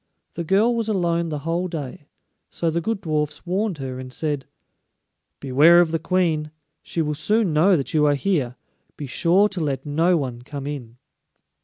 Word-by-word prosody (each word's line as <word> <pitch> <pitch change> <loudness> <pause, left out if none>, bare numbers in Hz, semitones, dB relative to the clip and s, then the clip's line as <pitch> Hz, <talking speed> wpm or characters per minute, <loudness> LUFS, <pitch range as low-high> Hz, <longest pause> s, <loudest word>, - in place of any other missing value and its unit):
The 170 - -4
girl 210 +8 +3
was 225 -1 -1
alone 170 -4 0
the 150 - -3
whole 170 +2 0
day, 155 -2 -7 0.4
so 165 -1 -1
the 170 +1 -1
good 220 +3 -2
dwarfs 150 -3 -2
warned 190 0 -1
her 130 -2 -5
and 130 0 -8
said: 145 -1 -3 0.9
"Beware 145 +6 +5
of 170 -2 +3
the 165 - 0
Queen; 165 -3 0 0.3
she 165 - -2
will 150 0 -1
soon 210 +4 +1
know 175 +5 +4
that 135 - -4
you 150 -1 +4
are 145 - +3
here; 140 -7 -1 0.4
be 145 - -5
sure 175 +9 +3
to 195 -4 -4
let 140 -2 -2
no 165 +5 +2
one 125 -5 -4
come 140 +2 -7
in." 125 -5 -6
160 Hz, 180 wpm, -23 LUFS, 145-180 Hz, 0.9 s, Beware